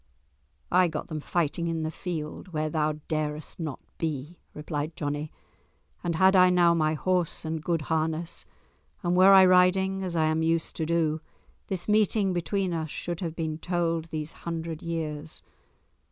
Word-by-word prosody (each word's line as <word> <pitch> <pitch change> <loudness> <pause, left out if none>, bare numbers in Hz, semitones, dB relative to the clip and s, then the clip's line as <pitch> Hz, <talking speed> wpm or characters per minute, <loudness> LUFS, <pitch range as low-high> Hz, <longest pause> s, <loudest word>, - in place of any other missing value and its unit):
"I 180 0 +5
got 155 -2 -5
them 155 - -3
fighting 170 +1 -1
in 165 -1 -1
the 155 - -2
field 160 -1 -5
where 155 0 -1
thou 155 -1 +1
darest 155 0 -3
not 155 -5 -4 0.2
be," 155 +1 -3 0.2
replied 150 +1 -4
Johnie. 145 0 -3 0.7
"And 170 -1 -1
had 190 +3 +5
I 185 -1 +7
now 175 -1 +5
my 155 -1 +1
horse 180 0 0
and 160 0 -2
good 165 -3 0
harness, 160 +1 -1 0.6
and 175 0 +1
were 185 +2 +7
I 190 -1 +9
riding 185 +1 +4
as 180 -2 -3
I 160 -1 +3
am 155 +1 +1
used 165 0 0
to 160 - -1
do, 160 -2 +1 0.5
this 185 -3 -3
meeting 210 -2 +3
between 180 +1 -1
us 160 -1 -2
should 175 +2 -4
have 165 -3 -4
been 160 -2 -3
told 170 -2 -1
these 155 -1 -5
hundred 165 -1 -5
years. 160 -2 -4
165 Hz, 165 wpm, -27 LUFS, 155-180 Hz, 0.7 s, I